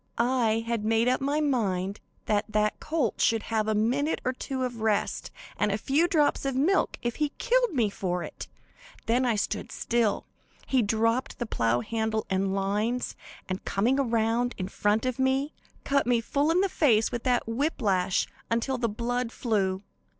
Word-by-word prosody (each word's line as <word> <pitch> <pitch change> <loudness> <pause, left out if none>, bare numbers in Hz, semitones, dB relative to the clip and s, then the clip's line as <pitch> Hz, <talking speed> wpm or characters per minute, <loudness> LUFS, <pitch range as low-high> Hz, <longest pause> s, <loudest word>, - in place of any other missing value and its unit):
I 235 -2 +2
had 230 -2 -1
made 225 +2 +2
up 255 +1 +2
my 285 +3 +1
mind 200 -9 0 0.3
that 210 0 +1
that 210 0 0
colt 305 -8 -1
should 225 -1 +2
have 220 -1 -1
a 215 - +1
minute 255 +8 +1
or 255 - +1
two 260 0 -4
of 240 -3 -4
rest 215 -2 0 0.3
and 210 - +1
a 200 - 0
few 285 +9 +2
drops 310 -5 +2
of 270 -1 -1
milk 320 +9 +2
if 240 -1 -2
he 300 -1 +1
killed - - +2
me 235 -5 +3
for 180 -3 -2
it. - - -8 0.6
When 245 +3 +2
I 235 - +2
stood 210 0 -2
still 235 -3 0 0.4
he 260 -2 +2
dropped 230 +3 0
the 240 - -2
plow 120 - +1
handle 220 - -1
and 190 0 +1
lines, 210 +5 -1 0.3
and, 185 0 -4
coming 240 +8 +1
around 235 -1 +1
in 185 0 -4
front 210 +3 +1
of 255 0 -2
me, 265 +3 +1 0.3
cut 280 -3 +1
me 245 -1 +3
full 280 +6 0
in 345 +3 +3
the 395 - +3
face 230 - +3
with 240 -1 -3
that 245 -3 +1
whip 275 +8 -1
lash 190 -3 +1 0.2
until 240 +3 0
the 230 -2 0
blood 240 +2 -2
flew. 195 -6 -1
230 Hz, 180 wpm, -27 LUFS, 210-260 Hz, 0.6 s, me